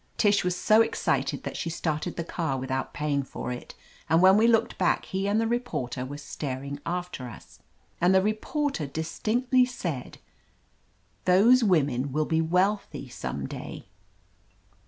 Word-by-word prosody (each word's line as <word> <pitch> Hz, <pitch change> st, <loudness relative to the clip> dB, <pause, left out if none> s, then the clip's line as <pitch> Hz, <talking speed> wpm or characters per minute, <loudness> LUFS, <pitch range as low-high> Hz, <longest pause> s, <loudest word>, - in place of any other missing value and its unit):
Tish 205 Hz, -2 st, +3 dB
was 180 Hz, 0 st, 0 dB
so 215 Hz, +4 st, +5 dB
excited -, -, 0 dB
that -, -, -5 dB
she 170 Hz, -, -3 dB
started 160 Hz, 0 st, -2 dB
the 170 Hz, -, -3 dB
car 160 Hz, -5 st, -2 dB
without 130 Hz, 0 st, -3 dB
paying 145 Hz, -1 st, -1 dB
for 130 Hz, -, -6 dB
it, 125 Hz, -, -7 dB, 0.3 s
and 165 Hz, +2 st, +5 dB
when 190 Hz, +2 st, +7 dB
we 220 Hz, +2 st, +5 dB
looked 230 Hz, -2 st, +2 dB
back 185 Hz, -, +2 dB
he 195 Hz, +1 st, -2 dB
and 205 Hz, +2 st, +2 dB
the 225 Hz, -, +1 dB
reporter 225 Hz, -, -2 dB
were 145 Hz, +2 st, -6 dB
staring 140 Hz, -1 st, -5 dB
after 175 Hz, -7 st, -4 dB
us; 65 Hz, -, -14 dB, 0.4 s
and 175 Hz, +2 st, +5 dB
the 190 Hz, -, +5 dB
reporter 215 Hz, -, -1 dB
dis 160 Hz, +4 st, -5 dB
tinctly 250 Hz, +3 st, +3 dB
said, 170 Hz, -, -5 dB, 1.1 s
"Those 225 Hz, +8 st, +6 dB
women 140 Hz, -, +2 dB
will 155 Hz, +3 st, +1 dB
be 160 Hz, +1 st, +1 dB
wealthy 180 Hz, -4 st, 0 dB
some 120 Hz, -, -5 dB
day." -, -, -7 dB
170 Hz, 155 wpm, -27 LUFS, 140-210 Hz, 1.1 s, when